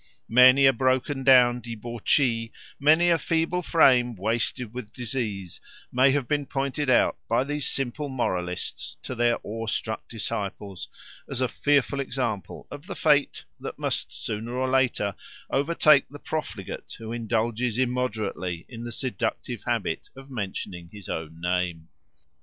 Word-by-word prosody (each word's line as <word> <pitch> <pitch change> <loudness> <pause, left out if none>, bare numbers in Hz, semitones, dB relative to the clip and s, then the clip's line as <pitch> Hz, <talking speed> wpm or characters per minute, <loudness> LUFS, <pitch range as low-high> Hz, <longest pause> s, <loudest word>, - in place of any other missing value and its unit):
Many 130 +3 +7
a 135 - +7
broken 130 +2 +1
down 125 -2 +6
debauchee, 115 +1 0 0.3
many 160 +5 +5
a 165 - +3
feeble 165 +3 0
frame 125 -8 +4
wasted 115 +3 -1
with 120 -4 -7
disease, 110 -7 -4 0.3
may 130 +2 +5
have 135 -2 +1
been 145 -2 0
pointed 140 +1 -1
out 125 - +4
by 115 +2 +3
these 145 +1 -2
simple 135 +2 -2
moralists 90 -9 -3
to - - -4
their 120 -1 +2
awe 115 +1 -5
struck 110 -1 -3
disciples 100 -4 -4 0.4
as 135 - -3
a 130 - +2
fearful 140 +1 +1
example 120 -7 -3
of 145 +4 -9
the - - -5
fate 145 -2 +2 0.2
that - - -6
must - - -2
sooner 115 +3 -5
or 130 +1 0
later 125 -6 +2 0.4
overtake 145 0 +4
the 145 - -9
profligate 155 +1 -5
who 115 -1 -7
indulges 115 0 -1
immoderately 110 -9 -1
in 115 -2 -8
the 120 - -5
seductive 120 -3 -2
habit - - -1
of 135 +1 -12
mentioning 95 -6 -5
his 105 -3 -10
own 80 0 -5
name. 90 -2 -1
125 Hz, 140 wpm, -26 LUFS, 110-135 Hz, 0.4 s, Many